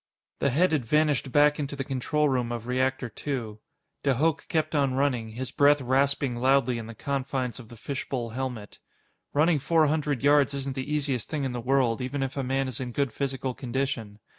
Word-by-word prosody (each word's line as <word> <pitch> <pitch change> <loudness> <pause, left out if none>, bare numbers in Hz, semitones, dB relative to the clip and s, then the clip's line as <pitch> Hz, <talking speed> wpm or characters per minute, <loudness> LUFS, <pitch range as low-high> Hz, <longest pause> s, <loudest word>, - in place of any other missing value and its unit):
The 140 - +2
head 165 +8 +3
had 150 -5 +1
vanished 145 0 +1
back 145 +2 +4
into 140 -1 -3
the 140 - -3
control 140 +3 0
room 125 -3 0
of 120 -1 -4
Reactor 130 +1 0
Two. 115 -4 -5 0.4
De 135 -2 +2
Hooch 155 +4 0
kept 160 -1 0
on 140 -3 +2
running, 130 -5 0
his 125 +2 -5
breath 145 +1 +5
rasping 135 0 +1
loudly 130 -1 +2
in 110 - -7
the 115 - -9
confines 135 -1 -2
of 115 -3 -12
the 120 - -12
fishbowl 130 -2 -4
helmet. 125 -4 -5 0.5
Running 155 +1 +3
four 160 +3 +3
hundred 150 -3 0
yards 145 -1 +4
isn't 135 -1 -3
the 130 +2 -5
easiest 140 -6 -1
thing 150 -3 -2
in 135 - -1
the 120 -1 -4
world, 125 -2 +2
even 135 +2 -2
if 135 0 -4
a 140 - -1
man 135 +1 0
is 130 - -6
in 125 -2 -5
good 140 -4 0
physical 135 -2 -2
condition. 125 -5 -3
135 Hz, 200 wpm, -27 LUFS, 125-145 Hz, 0.5 s, breath